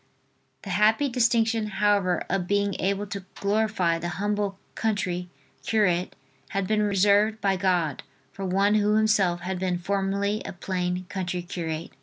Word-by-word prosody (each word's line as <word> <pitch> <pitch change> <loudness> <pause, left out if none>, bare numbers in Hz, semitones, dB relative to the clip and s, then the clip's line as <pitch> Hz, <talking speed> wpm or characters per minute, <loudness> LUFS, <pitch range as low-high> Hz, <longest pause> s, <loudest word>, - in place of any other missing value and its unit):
The 195 - -6
happy 220 +8 +3
distinction, 230 -2 +2
however, 200 -3 +1
of 180 -2 -1
being 200 0 +1
able 200 +2 0
to 200 -1 -6
glorify 200 -5 +1
the 170 - -3
humble 205 -1 -1 0.2
country 180 -5 -2 0.3
curate 185 -5 +1 0.3
had 195 -1 -1
been 215 +2 +1
reserved 205 +2 +3
by 195 -2 +1
God 180 -6 0 0.3
for 195 - -7
one 195 +2 +2
who 210 0 +3
himself 210 -5 +2
had 185 0 -3
been 180 -1 0
formerly 200 +3 -1
a - - -6
plain 180 0 -2
country 180 -2 -3
curate. 165 -2 -5
195 Hz, 145 wpm, -26 LUFS, 180-210 Hz, 0.3 s, happy